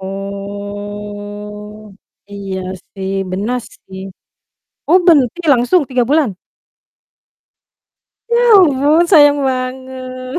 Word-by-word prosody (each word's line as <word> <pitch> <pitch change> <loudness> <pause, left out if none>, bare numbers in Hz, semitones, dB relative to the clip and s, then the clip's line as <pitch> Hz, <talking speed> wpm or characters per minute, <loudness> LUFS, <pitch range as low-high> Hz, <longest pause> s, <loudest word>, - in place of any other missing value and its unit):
Oh. 205 +1 -7 0.4
Iya 195 -2 -5 0.4
sih, 190 -1 -5 0.2
benar 215 +7 -2 0.2
sih. 190 0 -12 0.9
Oh 360 +4 +6
berhenti 295 -1 +4
langsung 265 +7 +3
3 255 -2 +1
bulan? 295 -4 +2 2.0
Ya 470 +1 +3 0.2
ampun! 300 -1 +4
Sayang 290 -4 +6
banget. 255 +1 -4
245 Hz, 80 wpm, -16 LUFS, 205-275 Hz, 2.0 s, Oh